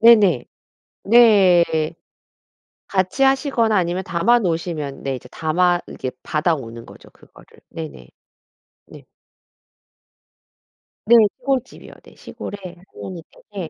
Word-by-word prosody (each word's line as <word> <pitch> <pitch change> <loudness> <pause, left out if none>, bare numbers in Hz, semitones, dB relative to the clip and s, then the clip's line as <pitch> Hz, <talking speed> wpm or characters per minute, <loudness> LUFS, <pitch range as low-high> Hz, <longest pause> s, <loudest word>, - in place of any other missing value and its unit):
네네. 205 - +5 0.6
네. 185 -8 +4 0.9
같이 190 +7 0
하시거나 265 -5 +2
아니면 180 0 0
담아 200 +9 +2
놓으시면 165 -6 -3
네 135 -1 -2
이제 125 0 -11
담아 175 +2 +1
이렇게 130 - -6
받아오는 140 -8 -2
거죠 - - -16
그거를. - - -20 0.2
네네. 155 - -9 0.8
네. - - -14 2.0
네. 235 +2 +6 0.2
시골집이요. 260 -1 -4
네. - - -18
시골에 205 - -9 0.4
할머니 175 -4 -8 0.3
댁에 185 -5 -6
175 Hz, 230 characters per minute, -20 LUFS, 155-220 Hz, 2.0 s, 네